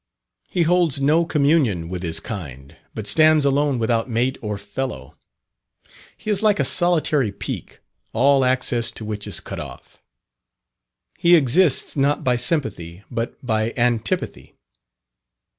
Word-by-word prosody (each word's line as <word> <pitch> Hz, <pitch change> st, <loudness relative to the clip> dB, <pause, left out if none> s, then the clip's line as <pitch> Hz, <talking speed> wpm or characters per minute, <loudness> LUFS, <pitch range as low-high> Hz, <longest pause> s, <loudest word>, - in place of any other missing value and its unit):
He 175 Hz, -, +1 dB
holds 165 Hz, -4 st, +1 dB
no 155 Hz, +5 st, +2 dB
communion 140 Hz, -, +1 dB
with 90 Hz, 0 st, -5 dB
his 80 Hz, -2 st, -1 dB
kind, 70 Hz, -, -8 dB, 0.2 s
but 110 Hz, -, -5 dB
stands 155 Hz, +4 st, +4 dB
alone 140 Hz, -1 st, +1 dB
without 115 Hz, +1 st, 0 dB
mate 125 Hz, +3 st, 0 dB
or 105 Hz, -2 st, -4 dB
fellow. 100 Hz, +7 st, -6 dB, 1.0 s
He 215 Hz, -, -4 dB
is 205 Hz, -, +1 dB
like 210 Hz, -2 st, +2 dB
a -, -, +3 dB
solitary 155 Hz, -, +2 dB
peak, 100 Hz, -, -7 dB, 0.3 s
all 135 Hz, +3 st, +3 dB
access 125 Hz, -2 st, +1 dB
to 110 Hz, -, -8 dB
which 105 Hz, -1 st, -5 dB
is -, -, -2 dB
cut -, -, -8 dB
off. -, -, -11 dB, 1.2 s
He 175 Hz, 0 st, +5 dB
exists 155 Hz, +1 st, +3 dB
not 145 Hz, +2 st, +1 dB
by 125 Hz, -3 st, +2 dB
sympathy 105 Hz, -, -2 dB
but 120 Hz, +2 st, -5 dB
by 110 Hz, -1 st, -1 dB
antipathy. 120 Hz, -4 st, -2 dB
125 Hz, 135 wpm, -21 LUFS, 110-155 Hz, 1.2 s, He